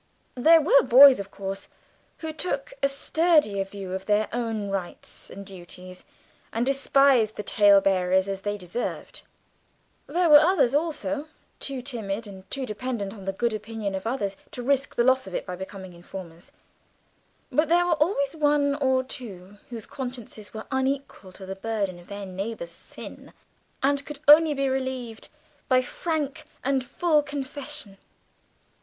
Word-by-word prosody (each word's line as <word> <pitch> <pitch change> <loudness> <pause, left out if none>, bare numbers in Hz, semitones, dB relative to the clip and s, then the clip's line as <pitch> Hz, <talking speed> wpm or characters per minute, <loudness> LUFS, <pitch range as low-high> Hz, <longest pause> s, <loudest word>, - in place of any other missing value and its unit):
There 320 +6 +6
were 280 -1 +5
boys, 260 +1 +8
of 200 0 -6
course, 195 0 -6 0.5
who 320 -1 -5
took 360 +9 -3
a 275 - +3
sturdier 295 - +2
view 195 -1 -8
of 190 0 -5
their 210 0 +2
own 225 -3 -2
rights 190 -3 -6
and 200 0 -9
duties, 185 -1 -11 0.5
and 230 +2 0
despised 275 -4 +3
the 210 - -5
talebearers 195 -2 +4
as 195 -1 -4
they 205 +1 -2
deserved; 185 +5 -5 0.9
there 355 0 +1
were 300 -2 +10
others, 310 -6 +3
also, 295 -1 -1 0.3
too 270 -3 -4
timid 225 -5 -4
and 190 -2 -12
too 270 -1 -3
dependent 215 -3 -4
on 200 -4 -11
the 195 - 0
good 235 +4 -1
opinion 215 -1 -4
of 190 +3 -4
others 205 -5 -2
to 245 - -7
risk 275 +1 +1
the 240 - +3
loss 260 -2 +3
of 190 - -6
it - - -3
by 180 - -5
becoming 190 0 -8
informers; 170 -1 -10 1.0
but 305 +1 +2
there 350 +1 +4
were 350 - +3
always 300 -4 +1
one 290 -2 +2
or 260 -2 +1
two 205 -6 -9
whose 230 -3 -7
consciences 245 -5 -7
were 220 0 -7
unequal 265 -7 -2
to 190 - -10
the 190 +1 -5
burden 200 -3 -3
of 175 - -16
their 200 0 -6
neighbour's 190 -1 -5
sin, - - -11 0.5
and 280 +1 +2
could 295 0 -8
only 305 0 +8
be 275 0 0
relieved 260 -4 -3 0.4
by 255 -1 +5
frank 300 0 -3 0.2
and 265 -1 +1
full 300 +5 +2
confession. 285 -6 -6
240 Hz, 155 wpm, -26 LUFS, 195-280 Hz, 1.0 s, were